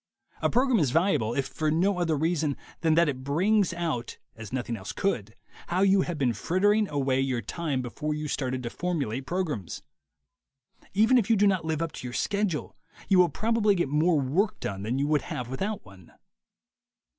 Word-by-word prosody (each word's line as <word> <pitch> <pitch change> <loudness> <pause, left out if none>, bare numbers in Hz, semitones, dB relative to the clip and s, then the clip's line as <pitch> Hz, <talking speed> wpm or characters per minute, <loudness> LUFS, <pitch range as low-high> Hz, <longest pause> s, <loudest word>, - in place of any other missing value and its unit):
A - - +2
program 250 -2 +3
is 150 -6 +2
valuable 145 - +1
if 135 - 0
for 155 -1 -2
no 180 +4 +2
other 165 -3 +1
reason 155 -2 0 0.2
than 160 -2 +2
that 170 0 +4
it 130 -3 -3
brings 185 +8 +2
out, 165 -9 -3 0.2
as 115 -2 -9
noth 125 -1 -3
ing 120 - -2
else 95 -2 -7
could, 110 - -2 0.3
how 180 +2 0
you 195 0 +5
have 175 -3 -3
been 130 -5 +1
frittering 205 - +2
away 135 -2 +1
your 130 -4 -1
time 145 - -2
before 150 +5 -3
you 150 0 -4
started 130 -2 -2
to 120 - -4
formulate 140 -8 -2
programs. 155 - -3 1.1
Even 225 +5 +5
if 220 -2 -2
you 225 - +5
do 205 0 +3
not 190 -5 +2
live 160 0 -1
up 165 - -3
to 125 - -7
your 120 - -7
schedule, 200 -1 -1 0.3
you 190 -2 +5
will 180 -1 +6
probably 215 +4 +2
get 175 -6 0
more 155 +2 +3
work 185 +11 0
done 95 -1 -4
than 115 +6 -2
you 140 - +1
would 150 0 +2
have 125 -1 -5
without 200 +9 -3
one. 95 -4 -16
155 Hz, 195 wpm, -27 LUFS, 130-190 Hz, 1.1 s, will